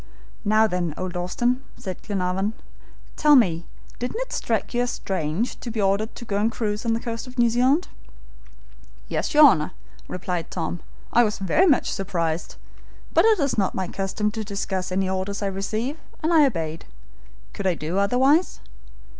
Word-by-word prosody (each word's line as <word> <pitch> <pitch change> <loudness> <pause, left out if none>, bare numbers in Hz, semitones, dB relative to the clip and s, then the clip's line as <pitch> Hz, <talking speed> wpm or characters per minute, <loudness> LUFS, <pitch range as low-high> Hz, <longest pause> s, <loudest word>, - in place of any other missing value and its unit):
"Now, 215 +1 +4
then, 180 -6 -1
old 185 -1 -4
Austin," 240 +9 0
said 185 -3 -6
Glenarvan, 195 +1 -1 0.6
"tell 300 -1 +6
me, 170 -9 +3 0.3
didn't 250 - -3
it - - -4
strike - - -1
you 240 - +1
as 245 - 0
strange 185 +3 -2
to 240 - -6
be 225 -1 -4
ordered 200 +2 +1
to 240 - -8
go 200 -3 -1
and 215 +3 +2
cruise 215 -1 -2
on 225 - +3
the 225 - 0
coast 230 +1 -5
of 250 - -12
New 235 -1 +4
Zealand?" 260 +8 +3 1.2
"Yes, - - -2
your 300 0 +10
Honor," 155 - +4 0.3
replied 180 -2 -3
Tom. 170 0 -3 0.3
"I 240 - +6
was 210 -2 0
very 250 - +3
much 285 -7 +3
surprised, 170 -4 -2 0.6
but - - +5
it 440 -3 +5
is 280 -6 +1
not 195 - 0
my 190 -1 -2
custom 195 +3 -2
to 220 0 -4
discuss 195 -3 -3
any 190 +1 +1
orders 190 +2 -2
I - - 0
receive, 215 +9 -2 0.2
and 325 +2 +2
I 305 -3 +7
obeyed. 165 -8 -4 0.7
Could 195 - -2
I 180 - +2
do 165 +5 -2
otherwise? 265 - +3
205 Hz, 175 wpm, -24 LUFS, 185-245 Hz, 1.2 s, your